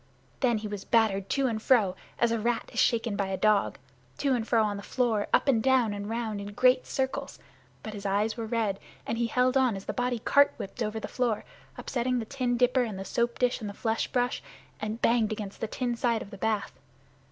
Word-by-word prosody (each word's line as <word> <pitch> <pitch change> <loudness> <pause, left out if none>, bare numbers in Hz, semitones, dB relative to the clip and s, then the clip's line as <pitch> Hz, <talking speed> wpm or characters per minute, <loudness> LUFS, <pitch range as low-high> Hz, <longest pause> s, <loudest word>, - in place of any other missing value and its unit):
Then 240 -4 +2
he 215 0 -4
was 205 -2 -5
battered 210 -4 +2
to 275 -1 +1
and 225 -4 -1
fro 215 -7 +3 0.2
as 235 -1 +2
a 230 - +1
rat 235 +1 -1
is - - -2
shaken 230 -3 +2
by 200 -1 -1
a 190 0 -2
dog 215 -1 +2 0.4
to 275 -2 +1
and 230 -3 -1
fro 225 -2 +3
on 205 -1 -1
the - - -6
floor, 225 -3 0
up - - +3
and 240 -5 +4
down, 255 -4 +3
and 205 0 -5
around 220 -2 -3
in 200 0 -7
great 255 +3 +4
circles, 265 0 -2 0.5
but 215 - -6
his 205 -1 -7
eyes 205 +2 +1
were 230 -2 -4
red 215 -4 0 0.3
and 230 - -2
he 235 - +1
held 250 +2 +2
on 255 -5 +3
as 195 - -7
the - - -3
body 245 0 0
cart 285 +5 +4
whipped 195 +5 -7
over 220 0 -1
the - - -5
floor, 240 -4 -1 0.3
upsetting 250 0 -1
the 230 - -2
tin 245 -1 -1
dipper 250 +1 +3
and 220 -5 -2
the 195 - -6
soap 235 +2 0
dish 250 -1 +1
and 210 - -4
the 200 - -8
flesh 225 -1 -1
brush, 245 0 0 0.4
and 215 +2 -4
banged 230 -2 +3
against 210 -2 -6
the 225 - -1
tin 245 +1 -2
side 235 -1 0
of 200 - -14
the 200 - -8
bath. 215 -2 -1
230 Hz, 230 wpm, -28 LUFS, 210-245 Hz, 0.5 s, and